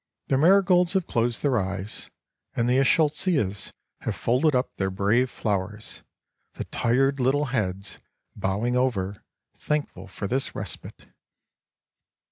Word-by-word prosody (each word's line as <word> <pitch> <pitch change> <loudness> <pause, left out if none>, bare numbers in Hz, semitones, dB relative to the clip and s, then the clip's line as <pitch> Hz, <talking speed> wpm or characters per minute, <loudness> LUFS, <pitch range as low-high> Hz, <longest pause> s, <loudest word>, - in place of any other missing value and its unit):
The 135 - +3
marigolds 180 +1 +5
have 190 -3 +1
closed 120 0 0
their 135 -5 +2
eyes, 100 +1 -5 0.5
and 115 - +1
the 125 +1 +3
eschscholtzias 140 - +1 0.3
have - - -3
folded 130 +5 +2
up 125 +1 -1
their 95 -1 0
brave 105 +7 +2
flowers, 105 0 -3 0.5
the - - -5
tired 135 +4 +1
little 135 +4 +2
heads 100 -4 -2 0.4
bowing 105 +6 -1
over, 105 -6 -1 0.3
thankful 145 -11 -3
for 100 +1 -6
this 130 +7 -2
respite. - - -7
120 Hz, 120 wpm, -25 LUFS, 100-140 Hz, 0.5 s, marigolds